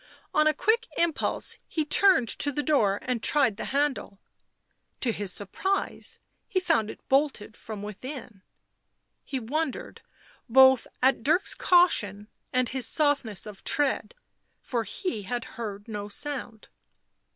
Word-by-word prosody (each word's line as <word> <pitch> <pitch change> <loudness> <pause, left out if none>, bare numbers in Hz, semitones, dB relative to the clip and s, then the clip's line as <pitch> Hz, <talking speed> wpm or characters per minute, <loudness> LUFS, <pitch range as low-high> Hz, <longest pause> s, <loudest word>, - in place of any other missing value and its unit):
On 305 0 +4
a - - +6
quick 460 +7 +1
impulse 335 -3 0
he 310 -2 -2
turned 365 -6 +5
to 285 - +2
the 295 +2 -2
door 220 -11 +2
and 250 -3 -2
tried 265 -8 +2
the - - -4
handle. 280 -7 -1 0.8
To 245 - +2
his 205 -3 -3
surprise 380 - -3 0.3
he 375 - 0
found 225 - +1
it - - -11
bolted 265 -6 +1
from 215 -2 -8
within; 220 0 -8 0.8
he 270 - -4
wondered 280 +4 -3 0.5
both 265 +1 +6 0.2
at 265 -2 +4
Dirk's 315 +9 +2
caution 215 - +2 0.2
and 255 -1 +1
his 255 -2 -1
softness 280 - 0
of 210 -2 -10
tread, 290 - 0 0.4
for 235 -3 -3
he 230 - -4
had 240 +5 -4
heard 205 -3 -6
no 205 -2 -5
sound. 245 -3 -5
255 Hz, 135 wpm, -27 LUFS, 215-295 Hz, 0.8 s, a